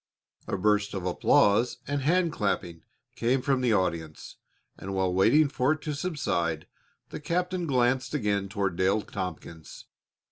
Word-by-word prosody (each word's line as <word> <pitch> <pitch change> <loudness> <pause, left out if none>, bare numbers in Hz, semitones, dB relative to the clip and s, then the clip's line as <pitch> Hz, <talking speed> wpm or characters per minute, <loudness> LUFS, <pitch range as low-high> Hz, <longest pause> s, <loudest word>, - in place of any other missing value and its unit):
A - - -2
burst 105 +1 +1
of 95 -2 -4
applause 100 +5 +3
and 145 0 -2
hand 170 +4 +2
clapping 85 - -2 0.3
came 125 +3 +1
from 135 -2 +1
the 120 -3 +2
audience, 85 -5 -2 0.4
and 95 +1 -6
while 95 -1 0
waiting 115 +12 +4
for 135 +1 +1
it 155 - -8
to 150 - -3
subside 90 - -2 0.5
the - - -6
captain 180 +3 -2
glanced 125 0 +1
again 100 -6 -1
toward 100 -4 -2
Dale 100 +3 +2
Tompkins. 85 -4 -7
105 Hz, 145 wpm, -27 LUFS, 95-140 Hz, 0.5 s, waiting